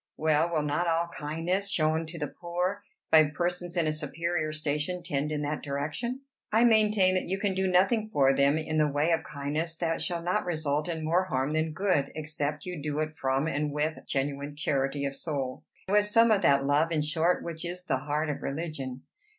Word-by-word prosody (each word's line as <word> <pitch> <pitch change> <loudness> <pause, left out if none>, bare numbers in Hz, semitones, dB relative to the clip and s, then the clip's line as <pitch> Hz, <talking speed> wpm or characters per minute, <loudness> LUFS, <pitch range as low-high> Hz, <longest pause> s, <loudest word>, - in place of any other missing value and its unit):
"Well, 155 +1 +2
will 155 -3 +1
not 150 +4 0
all 170 +1 +1
kindness 165 +6 -1
shown 160 -2 +1
to 165 +2 -7
the 150 -2 -2
poor 180 +3 -1 0.3
by 155 -2 +7
persons 175 +2 -2
in 170 - +2
a 155 - +1
superior 155 +1 -2
station 155 +3 -2
tend 150 -3 -1
in 150 -1 -2
that 150 +1 -2
direction?" 150 - -3 0.3
"I 225 +2 +4
maintain 215 -5 +4
that 185 - 0
you 190 +2 -1
can 195 -1 0
do 190 0 0
nothing 195 +5 +2
for 135 -8 +4
them 140 +2 +3
in 155 0 -1
the 150 -1 +3
way 145 +4 +1
of 165 - +2
kindness 150 +3 -3
that 165 -1 -1
shall 170 -2 -2
not 180 +5 0
result 155 -2 -1
in 160 -2 -3
more 175 +4 +2
harm 135 -3 -1
than 155 0 0
good, 170 -7 +1
except 150 -1 -3
you 180 -4 -5
do 150 0 -3
it 155 0 -1
from 135 0 0
and 150 -1 -1
with 150 +2 -1
genuine 140 +1 -2
charity 140 -1 -1
of 140 0 -3
soul; 135 -5 -4 0.2
with 205 +2 +5
some 230 +2 +5
of 205 -2 +4
that 140 -4 +4
love, 150 +4 +2
in 155 -2 +1
short, 160 +4 +1
which 165 -1 -6
is 175 +1 -5
the 140 -6 0
heart 150 +3 -1
of 145 - -6
religion. 135 -4 -4
155 Hz, 205 wpm, -28 LUFS, 145-175 Hz, 0.3 s, by